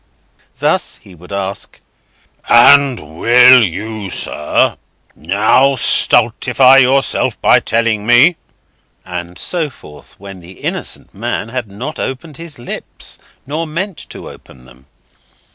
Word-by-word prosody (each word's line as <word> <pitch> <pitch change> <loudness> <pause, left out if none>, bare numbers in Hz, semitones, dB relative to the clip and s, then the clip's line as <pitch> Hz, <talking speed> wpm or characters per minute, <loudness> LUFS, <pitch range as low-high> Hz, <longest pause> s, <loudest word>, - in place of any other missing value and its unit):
Thus, - - 0
he 95 - -17
would 90 +2 -16
ask: 100 0 -5 0.7
"And 120 - +4
will 125 +1 +6
you, 105 +2 -5
sir, 75 -4 0 0.4
now 110 - +2
stultify 130 +1 +3
yourself 135 +1 +2
by - - +4
telling 110 -2 -1
me"—and 95 - -1
so 165 -4 -2
forth, 75 - -16
when 100 -1 -11
the 90 +2 -14
innocent - - -4
man 115 0 -4
had 125 -1 -5
not 120 +10 -7
opened 135 +2 -6
his 165 -2 -8
lips, 120 - -7 0.3
nor 155 +4 -4
meant 175 +4 -5
to - - -10
open 65 -1 -15
them. 65 +2 -20
115 Hz, 115 wpm, -14 LUFS, 95-135 Hz, 0.7 s, will